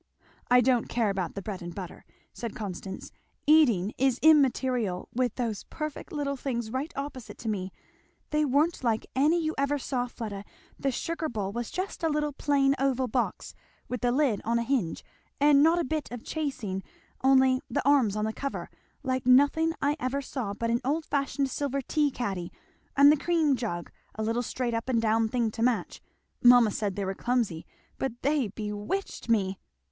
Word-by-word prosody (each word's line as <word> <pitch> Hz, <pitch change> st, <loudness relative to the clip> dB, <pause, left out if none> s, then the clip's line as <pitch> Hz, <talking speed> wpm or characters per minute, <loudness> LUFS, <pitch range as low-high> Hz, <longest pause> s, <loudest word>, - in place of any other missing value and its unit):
"I 250 Hz, 0 st, +6 dB
don't 245 Hz, -1 st, +2 dB
care 230 Hz, -4 st, +1 dB
about 190 Hz, -3 st, -3 dB
the 200 Hz, -, -5 dB
bread 200 Hz, -2 st, -5 dB
and 175 Hz, 0 st, -7 dB
butter," 185 Hz, -3 st, -8 dB, 0.3 s
said 235 Hz, -3 st, -6 dB
Constance; 190 Hz, -2 st, -6 dB, 0.3 s
"eating 240 Hz, -, +4 dB
is 265 Hz, -2 st, +3 dB
immaterial, 255 Hz, -, +3 dB
with 250 Hz, -1 st, 0 dB
those 230 Hz, -5 st, -3 dB
perfect 305 Hz, -2 st, -6 dB
little 285 Hz, -2 st, -2 dB
things 235 Hz, -4 st, -3 dB
right 270 Hz, +6 st, -3 dB
opposite 260 Hz, -6 st, -6 dB
to 230 Hz, -, -8 dB
me. 190 Hz, -3 st, -2 dB, 0.6 s
They 300 Hz, 0 st, +2 dB
weren't 295 Hz, +3 st, +1 dB
like 225 Hz, -2 st, +1 dB
any 300 Hz, +6 st, +3 dB
you 315 Hz, -1 st, -1 dB
ever 280 Hz, +1 st, +1 dB
saw, 255 Hz, -2 st, -2 dB
Fleda 210 Hz, -5 st, -6 dB, 0.4 s
the 275 Hz, -, 0 dB
sugar 320 Hz, +4 st, -2 dB
bowl 205 Hz, -4 st, -3 dB
was 235 Hz, +2 st, -4 dB
just 370 Hz, +1 st, -4 dB
a 325 Hz, -, +1 dB
little 300 Hz, -1 st, 0 dB
plain 275 Hz, -1 st, +2 dB
oval 265 Hz, -1 st, +1 dB
box, 245 Hz, +1 st, -2 dB, 0.3 s
with 250 Hz, -, -4 dB
the 245 Hz, -, +2 dB
lid 260 Hz, -6 st, +2 dB
on 230 Hz, +1 st, +1 dB
a 235 Hz, -, 0 dB
hinge, 230 Hz, -, -1 dB, 0.3 s
and 285 Hz, 0 st, +6 dB
not 325 Hz, +3 st, +5 dB
a 345 Hz, -, +1 dB
bit 310 Hz, +2 st, -3 dB
of 245 Hz, -1 st, -7 dB
chasing, 235 Hz, -11 st, -3 dB, 0.4 s
only 265 Hz, -1 st, +5 dB
the 245 Hz, -, -1 dB
arms 260 Hz, -8 st, +4 dB
on 215 Hz, 0 st, 0 dB
the 220 Hz, -, -2 dB
cover; 275 Hz, +3 st, -5 dB, 0.3 s
like 260 Hz, -2 st, -1 dB
nothing 285 Hz, +5 st, +5 dB
I 290 Hz, +1 st, +2 dB
ever 265 Hz, +3 st, -2 dB
saw 230 Hz, -8 st, -4 dB
but 230 Hz, +2 st, -1 dB
an 235 Hz, -, +1 dB
old 300 Hz, +4 st, 0 dB
fashioned 275 Hz, -1 st, -1 dB
silver 275 Hz, 0 st, -1 dB
tea 295 Hz, +2 st, +1 dB
caddy; 195 Hz, -9 st, -4 dB, 0.5 s
and 285 Hz, +1 st, +8 dB
the 305 Hz, -, +3 dB
cream 315 Hz, -2 st, +2 dB
jug 195 Hz, -9 st, -4 dB, 0.2 s
a 220 Hz, -, -3 dB
little 230 Hz, +2 st, 0 dB
straight 245 Hz, 0 st, -2 dB
up 230 Hz, +3 st, -2 dB
and 240 Hz, -3 st, +2 dB
down 225 Hz, 0 st, +2 dB
thing 235 Hz, -2 st, 0 dB
to 225 Hz, -, -6 dB
match. 245 Hz, 0 st, 0 dB, 0.4 s
Mamma 245 Hz, -3 st, +7 dB
said 200 Hz, -2 st, -2 dB
they 200 Hz, -, -2 dB
were 190 Hz, -, -2 dB
clumsy, 225 Hz, -8 st, -1 dB, 0.3 s
but 265 Hz, -3 st, -1 dB
they 285 Hz, -4 st, +2 dB
bewitched 210 Hz, -, -4 dB
me! 195 Hz, -4 st, +1 dB
250 Hz, 185 wpm, -28 LUFS, 220-280 Hz, 0.6 s, and